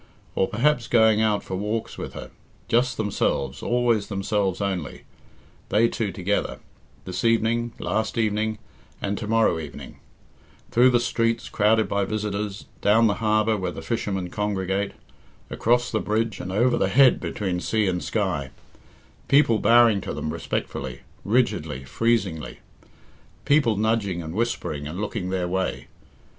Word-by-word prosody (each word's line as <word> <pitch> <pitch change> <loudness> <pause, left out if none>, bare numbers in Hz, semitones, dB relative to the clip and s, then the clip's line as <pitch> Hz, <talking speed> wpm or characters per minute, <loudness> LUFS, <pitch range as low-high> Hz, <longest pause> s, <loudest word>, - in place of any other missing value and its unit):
Or 95 - +1
perhaps 120 +2 +1
going 110 -2 +4
out 105 -2 +1
for 95 - -5
walks 105 +4 -3
with - - -7
her, - - -8 0.4
just 120 +2 +2
themselves, 70 - -1
always 120 -4 +1
themselves 100 -1 -1
only, 95 -7 -3 0.7
they 110 +3 +4
two 110 -4 -2
together, 95 +3 -2 0.5
this 90 - -4
evening, 115 +1 +1
last 110 +2 -2
evening, 110 0 0 0.4
and 100 0 -2
to 110 - -5
morrow 110 -6 +2
evening; 75 -3 -9 0.7
through 125 +2 +6
the 120 -1 +3
streets 115 -1 0
crowded 110 +1 +3
by 100 0 0
visitors, 105 -1 -3 0.2
down 110 +3 +4
the 105 - +3
harbour 110 0 +2
where 95 -3 -2
the 80 -1 -8
fishermen 95 -1 -2
congregate, 100 -1 -1 0.6
across 120 +1 +1
the 110 - +1
bridge 110 -1 -1
and 90 - -5
over 120 +6 +2
the - - +2
head 135 -1 +5
between 95 -4 -2
sea 110 +3 0
and 90 -1 -1
sky; 90 -11 -1 0.8
people 135 -6 +4
bowing 115 -2 +5
to - - -5
them 75 - -3
respectfully, 65 -3 -4 0.2
rigidly, 80 - 0
freezingly; 95 - -1 0.9
people 140 -7 +3
nudging 105 -5 0
and 80 0 -6
whispering 95 -10 -2
and 85 +5 -6
looking 100 -3 -3
their 95 -1 -1
way. 95 +1 -2
105 Hz, 145 wpm, -24 LUFS, 95-115 Hz, 0.9 s, through